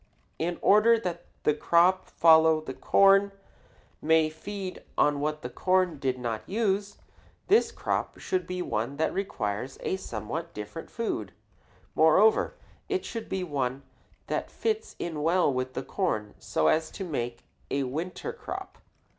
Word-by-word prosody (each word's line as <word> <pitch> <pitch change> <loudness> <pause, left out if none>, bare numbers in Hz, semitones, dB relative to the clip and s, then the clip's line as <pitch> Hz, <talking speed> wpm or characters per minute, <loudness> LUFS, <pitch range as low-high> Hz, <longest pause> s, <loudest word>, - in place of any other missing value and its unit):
In 170 +2 -1
order 220 +3 +6
that 175 -6 -4 0.2
the 150 - +4
crop 170 +5 +3
following 160 -1 +5
the 130 - -5
corn 195 +6 +4 0.7
may 160 0 +3
feed 190 +3 -6 0.2
on 145 -1 +3
what 150 +1 -2
the 125 - -4
corn 185 +1 +1
did 130 -2 -1
not 115 -3 -3
use, 205 -1 0 0.5
this 430 +4 +4
crop - - -2
should 180 -2 -2
be 180 0 -3
one 120 +3 -2
that 160 - 0
requires 125 - -3
a 190 - -1
somewhat 160 - -5
different 105 +10 -7
food. 110 - -3 0.6
Moreover, 160 +8 +4 0.3
it 385 -2 -1
should 230 -1 -6
be 190 -1 -2
one 135 -4 -2 0.4
that - - -2
fits 445 0 -2
in 160 -3 -4
well 165 -2 +3
with 130 0 -3
corn 110 - -2
so 80 - -1
as 160 0 +2
to 200 - -6
make 120 -8 -4 0.3
a 140 0 0
winter 165 - -4
crop. 390 -4 -7
165 Hz, 145 wpm, -28 LUFS, 135-195 Hz, 0.7 s, order